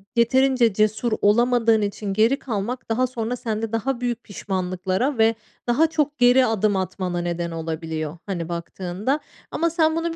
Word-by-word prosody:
yeterince 245 -1 +3
cesur 215 +3 +1
olamadığın 230 +1 +4
için 205 0 -3
geri 225 +7 +3
kalmak 235 +1 -4
daha 250 +3 +2
sonra 245 -1 -3
sende 225 -2 -3
daha 240 +2 -1
büyük 240 -1 -2
pişmanlıklara 190 +5 -2
ve 225 0 +4 0.3
daha 275 +7 +4
çok 300 -2 -1
geri 250 +1 +5
adım 215 -2 +1
atmana 185 -1 -2
neden 170 0 -2
olabiliyor, 160 -1 -4
hani, 175 -4 -4
baktığında. 180 - -3 0.3
Ama 335 +1 +1
sen 320 -1 +2
bunu 330 0 -2
225 Hz, 150 wpm, -23 LUFS, 185-250 Hz, 0.3 s, geri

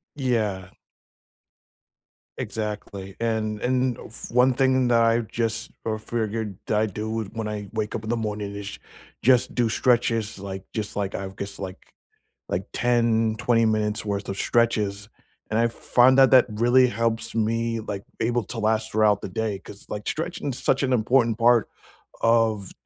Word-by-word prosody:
Yeah. 110 -9 -1 1.7
Exactly, 100 -3 -5
and 110 -2 -1
and 125 0 +1
f 110 - -9
one 125 +2 +4
thing 130 -1 +3
that 120 -1 +4
I 115 0 +3
just 115 0 -2 0.2
o 110 -1 -1
figured 110 -3 -3
I 110 0 +2
do 110 +2 -3
when 110 -1 -4
I 105 -2 -5
wake 110 -1 -2
up 110 - -4
in 110 - -6
the 120 - +1
morning 105 -2 -4
is 100 -1 -7 0.4
just 125 0 +3
do 120 -2 +2
stretches, 115 -3 +1
like, 95 -1 -6
just, 110 -2 -4
like, 100 -1 -2
I've 95 0 -5
guess 100 0 -6
like 95 -1 -6 0.7
like 90 +2 -2
10, 115 -2 +2
20 115 -2 +3
minutes' 110 -1 0
worth 100 -1 -3
of 95 - -4
stretches, 105 -4 0 0.4
and 110 - 0
I - - +4
f 115 - -2
find 130 +2 +4
that 135 -1 +7
that 130 -2 +7
really 120 +4 +4
helps 115 0 0
me, 115 +1 0
like, 100 -3 -5 0.2
able 120 +1 0
to 115 +4 -4
last 110 0 0
throughout 105 -1 +3
the - - -5
day 105 +1 -2
'cause, 100 - -13
like, 105 0 -5
stretching 165 -2 -3
is 125 - -6
such 135 - +1
an 130 -1 +1
important 120 0 +2
part 120 -1 +4 0.5
of 115 -4 +2
110 Hz, 165 wpm, -24 LUFS, 105-120 Hz, 1.7 s, that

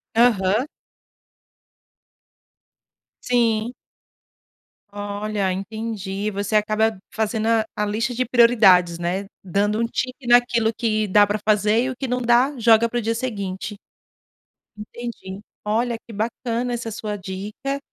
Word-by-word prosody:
Aham. 220 -1 +3 2.6
Sim. 235 -1 +1 1.2
Olha, 205 -1 -3
entendi. 205 0 -4
Você 200 +2 -2
acaba 215 +1 +2 0.2
fazendo 220 0 -1
a 225 -1 +3
a 210 - 0
lista 225 +4 -1
de 255 +2 -1
prioridades, 215 -8 +5
né? 180 +3 -2 0.2
Dando 205 +3 0
um 230 - +2
tique 255 +2 -4
naquilo 240 -2 +4
que 215 -1 0
dá 205 +2 +5
pra 205 +1 -2
fazer 215 +2 +3
e 260 - -1
o 260 - -5
que 265 +1 -4
não 250 0 -1
dá 245 +4 +3
joga 230 0 +5
pro 240 +1 -1
dia 230 +1 -1
seguinte. 205 -4 -4 1.0
Entendi, 210 -3 -8 0.3
olha 230 +3 0
que 230 - -10
bacana 235 +3 -2
essa 235 -1 -4
sua 210 -1 -4
dica. 205 +8 -5
220 Hz, 125 wpm, -22 LUFS, 205-235 Hz, 2.6 s, prioridades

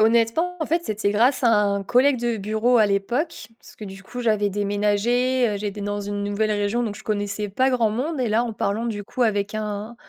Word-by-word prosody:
honnêtement 235 +11 +2
en 315 - -2
fait, 335 +2 0
c'était 210 -2 -1
grâce 250 +5 +2
à 230 - +5
un 200 -1 +1
collègue 255 +3 +3
de 240 -1 0
bureau 220 +4 +1
à 215 - +5
l'époque, 220 - -2
parce - - -17
que 215 - -8
du 195 0 -10
coup 245 +5 -7
j'avais 215 -3 +1
déménagé, 210 +5 +1
heu, 205 - -2
j'étais 205 0 -4
dans 205 0 -3
une 205 0 -4
nouvelle 205 +1 0
région 205 +3 0
donc 210 -3 -3
je - - -13
connaissais 205 0 -2
pas 260 +7 +1
grand 240 -3 +2
monde 265 +6 -2
et 240 - 0
là, 220 +3 +2
en 235 -2 -3
parlant 210 +3 -2
du 205 -3 -4
coup 250 +5 -2
avec 205 -2 0
un 215 +1 -4
215 Hz, 225 wpm, -23 LUFS, 205-240 Hz, -, à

